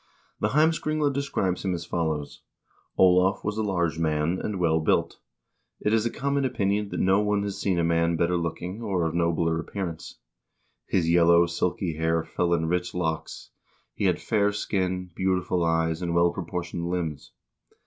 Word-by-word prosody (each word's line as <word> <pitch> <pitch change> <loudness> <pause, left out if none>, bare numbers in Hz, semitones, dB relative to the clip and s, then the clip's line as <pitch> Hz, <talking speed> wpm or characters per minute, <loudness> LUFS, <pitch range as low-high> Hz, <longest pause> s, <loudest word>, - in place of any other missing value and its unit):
The - - +1
"Heimskringla" 155 -1 +1
describes 130 -10 -1
him 95 -2 0
as 85 0 -6
follows: 80 -4 -3 0.6
"Olav 90 +1 +4
was 105 0 -2
a - - +2
large 85 -6 -1
man, 80 +2 0
and 105 -3 -3
well 80 -2 +2
built. 80 - 0 0.6
It 105 - 0
is 110 +1 +2
a - - -1
common 140 +3 -1
opinion 105 -5 0
that - - -4
no 95 +1 +3
one 105 -1 +1
has 100 -1 -4
seen 95 -3 +1
a 85 - +2
man 85 0 +2
better 85 +2 +1
looking, 90 +4 -4
or 95 -6 -1
of 80 - -1
nobler 85 -1 +1
appearance. 85 -1 -6 0.7
His 90 -4 +1
yellow, 85 0 +5
silky 85 -1 -2
hair 80 0 +1
fell 85 +2 -1
in 80 -1 -1
rich 90 +2 -1
locks; 80 -3 -3 0.4
he - - -2
had - - +2
fair 105 -2 +1
skin, 95 -3 -2
beautiful 90 -1 0
eyes, 80 0 +1
and 85 -1 -2
well 85 0 +4
proportioned 85 -1 -4
limbs. 85 -5 -3
90 Hz, 170 wpm, -26 LUFS, 85-100 Hz, 0.7 s, yellow